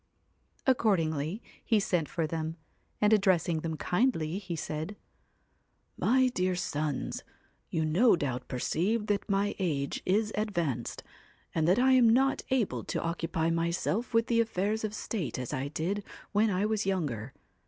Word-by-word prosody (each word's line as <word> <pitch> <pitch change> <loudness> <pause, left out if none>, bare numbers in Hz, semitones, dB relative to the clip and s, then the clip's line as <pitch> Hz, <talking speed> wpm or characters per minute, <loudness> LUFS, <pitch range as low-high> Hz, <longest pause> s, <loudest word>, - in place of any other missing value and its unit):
Accordingly 180 - +1 0.2
he 220 -3 +3
sent 175 -6 0
for 165 -2 -1
them, 160 +1 -3 0.4
and 210 +1 +4
addressing 185 -5 +3
them 160 0 -3
kindly, 180 - 0
he 185 -4 -5
said 155 +5 -4 0.5
' - - -43 0.3
My 260 +1 +4
dear 185 -5 0
sons, 150 -5 -2 0.5
you 160 -1 0
no 185 +10 +5
doubt 130 -6 -3
perceive 195 - 0
that 205 0 -1
my 200 +1 +1
age 145 -7 -1
is 210 +3 +1
advanced, 170 - -2 0.5
and 160 -1 +1
that 185 +4 +4
I 260 +2 +4
am 250 -3 +6
not 265 +4 +3
able 255 -6 0
to - - -2
occupy 165 -1 -1
myself 170 +8 -1
with 230 -1 +3
the 230 -1 +3
affairs 220 0 -1
of 215 0 -2
state 200 - -3
as 125 -2 -4
I 130 +2 -2
did 175 +8 -2 0.3
when 215 +2 +3
I 195 +1 +1
was 215 -2 0
younger. 140 - -2
185 Hz, 155 wpm, -30 LUFS, 160-215 Hz, 0.5 s, am